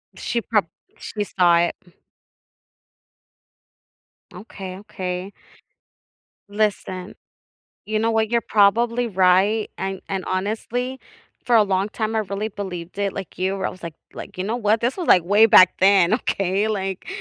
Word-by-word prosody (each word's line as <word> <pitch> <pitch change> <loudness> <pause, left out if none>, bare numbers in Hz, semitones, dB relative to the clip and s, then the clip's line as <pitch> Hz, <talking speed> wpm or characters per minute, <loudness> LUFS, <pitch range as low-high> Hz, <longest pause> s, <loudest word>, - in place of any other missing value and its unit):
She 235 - -2
prob 210 -6 0 0.3
She 210 -1 -4
saw 175 -3 +3
it. 175 - 0
Mm. 175 - -22 2.4
Okay, 185 -1 -9
okay. 190 -2 -6 1.2
Listen. 205 -3 -2 0.7
You 215 0 -1
know 225 +1 +1
what, 220 -1 +1
you're 235 -1 +1
probably 230 +4 +3
right, 195 +2 +2
and 190 0 -4
and, 190 -1 -2
honestly, 230 +7 -3 0.5
for 240 -2 +4
a 215 - +6
long 195 0 0
time 220 0 -3
I 220 - +1
really 205 +1 -3
believed 185 -3 -7
it, 200 -1 -1
like 190 -4 -8
you, 190 +2 -1
where 190 - -2
I - - -2
was, 185 - -14
like 165 -2 -7 0.2
like, - - -10
"You 185 - -3
know 225 +4 -2
what? 220 -1 +1
This 250 +10 -1
was, 350 - -3
like, 175 -2 +6
way 205 +4 +5
back 185 -4 +6
then, 190 -1 +5
okay, 200 -2 0
like, 195 -3 -3
200 Hz, 155 wpm, -22 LUFS, 185-220 Hz, 2.4 s, a